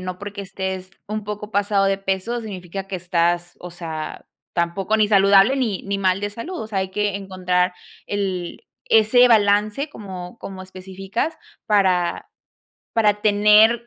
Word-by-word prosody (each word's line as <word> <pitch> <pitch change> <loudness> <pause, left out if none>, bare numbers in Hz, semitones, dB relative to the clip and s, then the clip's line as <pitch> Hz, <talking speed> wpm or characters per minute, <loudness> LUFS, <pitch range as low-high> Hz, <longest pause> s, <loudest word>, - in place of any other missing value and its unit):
no 185 0 -5
porque 200 0 -6
estés 190 -1 -5 0.2
un 215 0 -4
poco 210 0 -6
pasado 200 -1 +2
de 195 0 +2
peso 195 +5 -2
significa 195 -2 -6
que 195 -1 -4
estás, 175 0 0
o 180 - -8
sea, 160 -3 -6 0.3
tampoco, 185 +5 0
ni 210 -1 +3
saludable, 200 +5 +5
ni 225 -8 -1
ni 200 0 -2
mal 190 0 +1
de 205 - -1
salud, 320 - -6
o 220 - -5
sea, 205 -3 -2
hay 190 0 -3
que 205 0 -1
encontrar 185 -2 0 0.3
el 190 -4 -3 0.3
ese 225 +3 +6
balance 210 +5 +3
como 190 -5 -9
como 190 -3 -8
específicas 190 - -4 0.3
para 185 -5 +2 0.6
para 210 -2 +2
tener 215 +3 +5
195 Hz, 150 wpm, -22 LUFS, 185-210 Hz, 0.6 s, ese